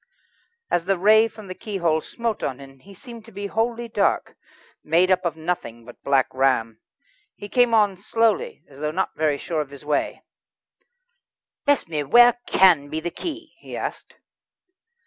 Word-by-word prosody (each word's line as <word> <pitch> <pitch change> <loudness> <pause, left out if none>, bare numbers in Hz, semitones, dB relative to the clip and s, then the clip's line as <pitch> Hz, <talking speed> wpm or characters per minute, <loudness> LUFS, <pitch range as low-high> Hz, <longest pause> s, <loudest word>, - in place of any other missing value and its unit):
As 170 - +1
the 195 0 +1
ray 215 +4 +5
from 215 -1 -13
the 185 - -6
keyhole 175 -6 -1
smote 230 +3 -4
on 130 0 -3
him 135 -1 -14
he 195 +7 -15
seemed 235 +1 -11
to 230 - -15
be 200 0 -6
wholly 230 +3 -2
dark, 230 - 0 0.5
made 175 +4 +3
up 185 0 +2
of 165 -3 -1
nothing 155 -9 -4
but 120 - -14
Black 135 -2 +3
Ram. 125 -4 +1 0.6
He 205 - -9
came 245 +1 +3
on 205 -3 +3
slowly, 230 - 0
as 140 -1 -16
though 150 0 -1
not 185 +5 -2
very 155 -2 +1
sure 160 +1 -2
of 145 - -6
his 140 +1 -13
way. 150 -1 -1 1.4
"Bless 285 -9 +2
me! 155 -3 -2
where 240 - +6
can 170 -7 +4
be 155 - -3
the 170 +2 -4
key?" 330 - -7
he - - -8
asked. - - -6
185 Hz, 170 wpm, -23 LUFS, 150-225 Hz, 1.4 s, where